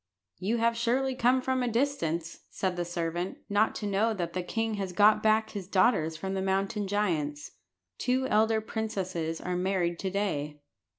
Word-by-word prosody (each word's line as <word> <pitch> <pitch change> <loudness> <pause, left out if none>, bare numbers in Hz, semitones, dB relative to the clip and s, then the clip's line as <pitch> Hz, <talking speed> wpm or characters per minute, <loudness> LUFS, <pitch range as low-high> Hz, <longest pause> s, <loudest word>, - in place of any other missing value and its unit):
"You 215 +6 0
have 230 0 +2
surely 255 +3 +1
come 255 +1 +2
from 260 0 0
a 250 - 0
distance," 195 - -1
said 185 -2 -2
the 175 0 -2
servant, 175 +1 -3
"not 205 +2 +2
to 210 - -4
know 210 +3 +1
that 170 -3 -3
the 185 - -1
king 225 +5 -2
has 195 -3 -3
got 210 +4 +5
back 220 0 +2
his 200 -4 -6
daughters 185 -6 +2
from 190 +4 -4
the 190 - -1
mountain 195 +2 0
giants. 160 -8 -1 0.5
The - - -4
two 260 +1 +1
elder 220 -1 +3
princesses 190 -7 -3
are 180 - -3
married 180 -2 0
to 190 - -2
day." 150 -7 -2
195 Hz, 180 wpm, -29 LUFS, 175-225 Hz, 0.5 s, got